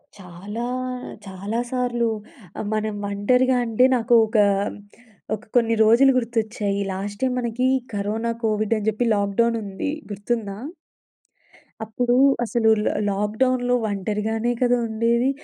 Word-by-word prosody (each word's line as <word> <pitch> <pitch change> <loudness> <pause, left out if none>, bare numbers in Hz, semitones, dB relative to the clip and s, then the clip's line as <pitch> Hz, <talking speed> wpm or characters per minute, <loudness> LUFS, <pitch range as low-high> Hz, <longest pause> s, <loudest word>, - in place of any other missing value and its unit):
చాలా 195 +4 -7 0.6
చాలా 200 +4 -4
సార్లు 245 -2 0 0.7
మనం 215 0 -1 0.2
ఒంటరిగా 250 +6 +2
అంటే 230 +3 +3
నాకు 235 -1 +1
ఒక, 220 +1 -2 1.0
ఒక 215 - -12
కొన్ని 230 -2 +3
రోజులు 235 +5 +6
గుర్తొచ్చాయి. 220 -4 -1
లాస్ట్ 200 +2 -5
టైమ్ 260 -1 +1
మనకి 240 +1 -1 0.3
కరోనా 215 +3 -2
కోవిడ్ 215 0 +1
అని 215 0 -4
చెప్పి 220 +3 -1
లాక్‌డౌన్ 210 +3 +1
ఉంది. 200 +8 -4 0.2
గుర్తుందా? 205 0 -3 1.3
అప్పుడు 240 +3 0 0.3
అసలు 230 -1 +1 0.2
ల - - +2 0.2
లాక్‌డౌన్‌లో 245 +5 0
ఒంటరిగానే 215 +4 -1
కదా! 245 0 +4
ఉండేది. 235 +3 +1
225 Hz, 115 wpm, -23 LUFS, 205-240 Hz, 1.3 s, రోజులు